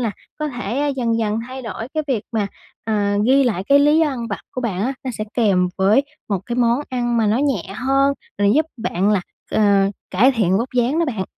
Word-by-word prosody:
là 230 -3 0 0.3
có 305 -1 -2
thể 250 +3 -2
dần 230 -3 0
dần 215 -1 0
thay 260 +1 -7
đổi 225 0 -6
cái 310 - 0
việc 235 -6 0
mà, 215 -3 0 0.4
ờ, 220 - -2 0.3
ghi 270 +2 +5
lại 200 -7 -1
cái 280 +6 +5
lý 295 +2 +4
do 320 - +3
ăn 245 -5 -4
vặt 200 - -4
của 255 - -5
bạn 205 -7 -2
á, 255 +5 0
nó 260 - -2
sẽ 215 - -2
kèm 195 -6 +3
với 205 +7 +4 0.3
một 200 -3 0
cái 240 - -3
món 240 +1 +2
ăn 240 -2 -1
mà 225 -2 +2
nó 215 +3 +2
nhẹ 270 -9 +1
hơn, 275 +3 +2 0.3
rồi 205 0 +3
giúp 310 +1 +3
bạn 205 -3 0
là, 205 - +2 0.3
ờ, 200 -2 +3 0.2
cải 240 +9 +4
thiện 195 -6 +2
vóc 235 +4 -2
dáng 250 +6 +2
đó 335 - +3
bạn. 220 -11 -2
235 Hz, 230 wpm, -20 LUFS, 210-265 Hz, 0.4 s, ghi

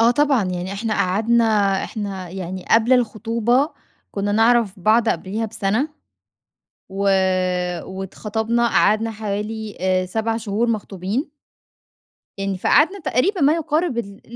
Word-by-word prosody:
آه 230 +1 +5
طبعًا 275 -4 +2
يعني، 180 +1 -3
إحنا 215 +2 -2
قعدنا 225 +5 +2 0.4
إحنا 195 -4 -5
يعني 185 0 -6
قبل 230 +3 +4
الخطوبة 235 +3 +1 0.4
كنّا 205 0 -2
نعرف 225 -3 +3
بعض 220 +3 +3
قبليها 215 +2 -2
بسنة. 220 +7 -1 1.0
و 195 +1 -3 0.8
واتخطبنا 220 +5 -2
قعدنا 220 +1 +2
حوالي 215 0 -4
آآ 185 0 +1
7 225 +4 -1
شهور 225 +1 -1
مخطوبين. 210 - -3 1.1
يعني 195 -1 -2
فقعدنا 330 - +3
تقريبًا 340 - 0
ما 285 +2 +5
يقارب 320 -4 -1
ال 200 -3 -6
220 Hz, 115 wpm, -21 LUFS, 195-235 Hz, 1.1 s, آه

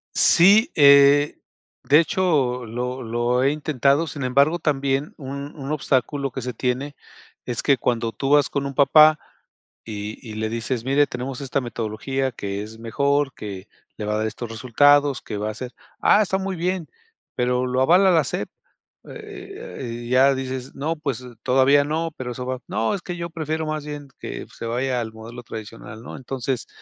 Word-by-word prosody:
Sí, 205 - +6
eh 140 0 +6 0.5
de 150 +3 +6
hecho, 145 -9 +1
lo 125 +3 -4
lo 120 +2 0
he 135 - +3
intentado. 145 +1 +1
Sin 140 -1 -6
embargo, 140 +7 +3
también 140 0 -1
un 140 +1 -7
un 140 -1 -6
obstáculo 140 -1 0
que 130 - -5
se 125 +1 -4
tiene, 130 +4 -2 0.5
es 120 -2 -3
que 140 - +4
cuando 115 -1 -1
tú 135 - -3
vas 145 -1 +5
con 140 -1 -2
un 140 - -7
papá 155 +3 +6 0.6
y 105 0 -6
y 110 -4 -9
le 110 0 -2
dices: 115 +1 -3
"Mire, 140 +2 +3
tenemos 125 +2 -5
esta 140 0 -1
metodología 120 +3 -3
que 100 -2 -5
es 110 +1 -10
mejor, 140 +5 0
que 100 -2 -8 0.3
le 105 - -4
va 105 - -1
a - - 0
dar 110 - 0
estos 115 +1 -6
resultados, 140 +5 +3
que 105 - -6
va 105 +1 -2
a - - -4
ser 125 +2 -7 0.3
'Ah, 210 - +5
está 190 -1 +1
muy 190 0 -3
bien, 180 -1 -2 0.5
pero, 125 0 +1
¿lo 125 +1 0
avala 180 +7 +5
la 160 -4 +4
SEP?'" 105 - -4 0.6
Eh - - -14
eh 90 - -9 0.3
eh, - - -7
ya 130 +2 +5
dices: 130 0 -5
"No, 155 +4 -2
pues 135 -5 -4 0.2
todavía 135 +2 +4
no, 160 +3 -2
pero 125 -1 -5
eso 125 +1 -6
va 130 -1 -3
'no, 110 +1 0
es 195 - -3
que 175 -1 -6
yo 170 0 -4
prefiero 160 -1 -3
más 155 -1 -3
bien 145 -1 -7
que - - -6
se - - -7
vaya 125 +2 -1
al 110 -1 -5
modelo 115 +2 -10
tradicional'", 110 -1 -9
¿no? - - -8
Entonces 130 -1 -4
135 Hz, 185 wpm, -23 LUFS, 120-145 Hz, 0.6 s, Sí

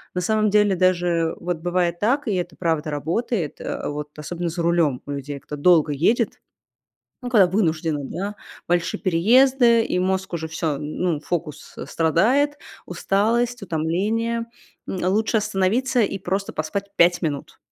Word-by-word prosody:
На 180 - 0
самом 215 +2 +2
деле 210 -2 +3
даже 175 -2 +1
вот 175 -1 -2
бывает 175 0 -1
так, 265 +6 +1
и 210 - +1
это 175 -3 -3
правда 160 -3 -1
работает, 165 - -2
а, - - -4
вот 150 0 -5
особенно 170 +3 -4
за 170 +1 -3
рулем 165 -6 +2
у 145 - -6
людей, 140 0 -5
кто 150 0 -8
долго 160 -2 +4
едет, 215 - +1 0.8
ну, 245 - -4
когда 205 -6 +6
вынужденно, 165 -5 0
да, 200 +9 -5 0.3
большие 175 0 0
переезды, 235 +6 +4
и 180 - -1
мозг 190 0 -1
уже 160 -1 -3
всё, 160 -2 -2
ну, 155 +1 -2
фокус, 160 -2 -5
э, - - -6
страдает, 245 - +2 0.3
усталость, 225 +6 0
утомление- 205 +8 -1 0.4
м, 185 -2 -3
лучше 220 +2 +1
остановиться 215 +5 +1
и 200 -2 0
просто 195 +2 -3
поспать 175 +6 -3
5 175 +1 +4
минут. 145 -3 -4
180 Hz, 150 wpm, -22 LUFS, 160-215 Hz, 0.8 s, когда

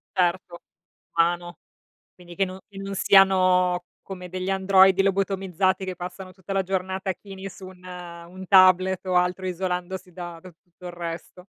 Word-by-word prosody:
Certo, 175 -1 0 0.5
umano. 175 +1 0 0.6
Quindi 175 -1 -13
che 195 - +1
no 185 0 -8
che 195 -2 -12
non 195 0 -5
siano 185 -2 +4 0.2
come 180 -2 -8
degli 185 +1 -4
androidi 190 0 +5
lobotomizzati 195 -1 0
che 185 -2 -5
passano 185 +1 -8
tutta 190 +1 -8
la 195 0 +1
giornata 190 +1 -2
chini 195 +1 -9
su 190 0 -11
un 185 -1 -14
un 180 0 -10
tablet 185 -1 +5
o 185 - -1
altro 180 +1 +1
isolandosi 180 0 -4
da 175 -1 -8
da 185 - -12
tutto 175 +2 -16
il 175 - -6
resto. 170 +1 -7
185 Hz, 155 wpm, -24 LUFS, 180-190 Hz, 0.6 s, androidi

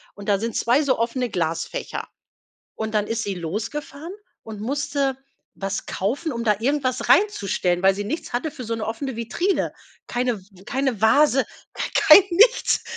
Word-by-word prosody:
und 200 0 -7
da 200 -1 +3
sind 230 +1 -3
2 245 +5 +3
so 275 -4 +1
offene 240 +2 -1
Glasfächer. 175 - -3 0.7
Und 220 0 -4
dann 210 -1 +1
ist 225 +1 -2
sie 200 -3 -3
losgefahren 230 - -5 0.3
und 215 -2 -9
musste 280 +2 -1 0.4
was 195 0 -4
kaufen, 275 - -2
um 235 -1 -3
da 210 -2 +3
irgendwas 255 +1 -1
reinzustellen, 195 - +2
weil 195 0 +5
sie 205 +1 -4
nichts 315 +11 -5
hatte 250 +6 -1
für 280 -4 -8
so 230 0 -2
'ne 225 -1 -3
offene 235 +4 -4
Vitrine. 245 - -1 0.4
Keine 245 -2 -1
w 190 0 -20
keine 260 -2 -1
Vase, 270 +4 +4 0.3
gar - - -2
kein 390 - +8
nichts 420 +8 +4
235 Hz, 165 wpm, -23 LUFS, 205-280 Hz, 0.7 s, kein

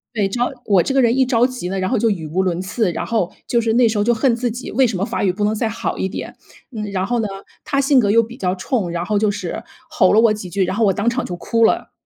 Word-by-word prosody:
对， 205 -3 +1
只 195 +5 -4
要 245 - +1
我 195 -5 +4
这 270 - -2
个 270 - +4
人 235 -1 +3
一 265 - +4
着 245 -1 +3
急 250 -9 -6
呢， 195 +1 -2
然 185 - -1
后 250 - +1
就 225 +1 +2
语 175 -7 -3
无 180 +5 0
伦 180 -1 -1
次， 190 +1 -1
然 - - -4
后 215 -6 -1 0.2
就 235 - +2
是 225 -1 0
那 240 0 +4
时 220 -1 -1
候 205 - +2
就 240 +3 +3
恨 235 +1 +2
自 240 0 -2
己， 245 +3 -7
为 265 - +4
什 225 -5 -1
么 190 - -1
法 230 - -3
语 190 - +3
不 205 +3 -2
能 215 +1 0
再 220 +1 -1
好 220 - -3
一 190 - -1
点。 - - -7 0.4
嗯， 215 - -3
然 190 -1 -1
后 240 +3 -1
呢， 220 - 0 0.4
他 275 - -1
性 275 0 +3
格 210 -5 +4
又 230 +2 +5
比 230 +1 -8
较 185 -6 -1
冲， 185 -1 -2
然 170 0 -3
后 210 +1 0
就 210 0 +2
是 205 +1 -5 0.3
吼 - - +3
了 215 - +5
我 225 -1 +5
几 210 -4 -7
句， 190 +1 0
然 185 - -3
后 230 - +1
我 200 - +4
当 205 +5 0
场 250 +1 -2
就 - - -6
哭 230 +5 0
了。 225 - +2
220 Hz, 340 characters per minute, -19 LUFS, 190-235 Hz, 0.4 s, 又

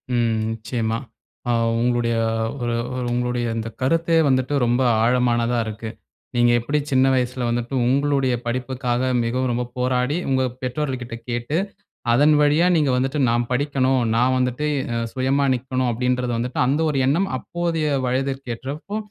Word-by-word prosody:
ம். 120 -1 +2 0.2
நிச்சயமா. 115 0 -2 0.5
ஆ - - +3 0.3
உங்களுடைய 120 -1 +1 0.5
ஒரு 120 0 -1 0.2
ஒரு 125 -1 -2
உங்களுடைய 125 0 -1
இந்த 115 0 -3
கருத்தே 165 +5 +2
வந்துட்டு 130 +1 +1
ரொம்ப 120 +2 +1 0.2
ஆழமானதா 120 0 +2
இருக்கு. 110 +1 -6 0.5
நீங்க 120 0 +4
எப்டி 145 +6 -1
சின்ன 130 0 +4
வயசுல 125 -1 0
வந்துட்டு, 120 +2 -2
உங்களுடைய 135 -1 +2
படிப்புக்காக 125 0 -2 0.2
மிகவும் 125 +2 -1
ரொம்ப 120 +1 -1
போராடி, 125 +3 0
உங்க 130 -1 +2 0.2
பெற்றோர்கள்க 130 +1 -2
கிட்ட 115 -1 -7
கேட்டு, 120 +6 -2 0.6
அதன் 145 +5 +5
வழியா 150 +4 +4
நீங்க 150 -4 +2
வந்துட்டு 135 +3 -1
நான் 120 0 0
படிக்கணும், 135 -1 +1 0.2
நான் 125 +2 +3
வந்துட்டு 125 +3 -1 0.3
அ 115 - 0
சுயமா 135 +2 +1
நிக்கணும் 130 0 -1
அப்டின்றத 125 +1 0
வந்துட்டு, 125 +2 -2
அந்த 140 +4 +1
ஒரு 140 - -1
எண்ணம் 175 +8 +2
அப்போதைய 170 0 -2 0.2
வயதிற்கு 135 0 -2
ஏற்றப்போ 150 - -6
125 Hz, 145 wpm, -22 LUFS, 120-135 Hz, 0.6 s, அதன்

